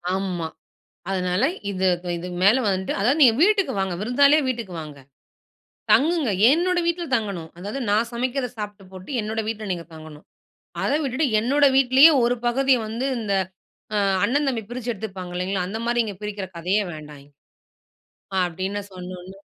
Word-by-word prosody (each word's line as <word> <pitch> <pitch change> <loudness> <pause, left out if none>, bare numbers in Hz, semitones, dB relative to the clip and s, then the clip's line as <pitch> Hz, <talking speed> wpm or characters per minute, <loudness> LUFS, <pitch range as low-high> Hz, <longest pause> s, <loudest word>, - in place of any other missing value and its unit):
ஆமா. 185 -4 -2 0.7
அதனால, 180 0 0 0.3
இதுக் 185 -2 0
இதுக்கு 180 +1 -6
மேல 245 +6 +5
வந்துட்டு 190 -2 -1
அதாவது 250 +9 +2
நீங்க 235 -4 +7
வீட்டுக்கு 395 -7 +3
வாங்க. 190 -2 -1
விருந்தாளியா 280 +7 +4
வீட்டுக்கு 230 -7 -3
வாங்க. 150 -2 -9 0.9
தங்குங்க. 310 -3 +3 0.2
என்னோட 350 +4 +2
வீட்ல 340 0 0
தங்கணும். 195 -8 -5
அதாவது 205 +9 -5
நான் 220 +3 +2
சமைக்கறத 250 +2 -2
சாப்ட்டு 205 -2 -6
போட்டு 185 +6 -10
என்னுடைய 220 +1 -3
வீட்ல 215 -2 -4
நீங்க 170 -2 -5
தங்கணும். 155 -1 -12 0.6
அத - - 0
விட்டுட்டு 270 +3 0
என்னுடைய 275 +4 +3
வீட்லேயே 270 +4 +7
ஒரு 245 +1 +2
பகுதிய 265 +1 +3
வந்து 230 +5 -3
இந்த 210 -3 -2 0.6
அ - - +2 0.3
அண்ணன், 285 +3 +1
தம்பி 240 -4 -1
பிரிச்சு 245 0 -4
எடுத்துப்பாங்க 190 -4 -7
இல்லைங்களா, 185 +1 -1
அந்த 220 +4 -4
மாரி 240 0 +1
இங்க 210 -2 -5
பிரிக்கிற 205 -2 -4
கதையே 190 +5 +1
வேண்டாம். 150 -2 -11 1.1
ஆ - - -2
அப்டின்னு 190 +4 -4
சொன்னோடனே, 185 +1 -9
210 Hz, 150 wpm, -23 LUFS, 185-255 Hz, 1.1 s, நீங்க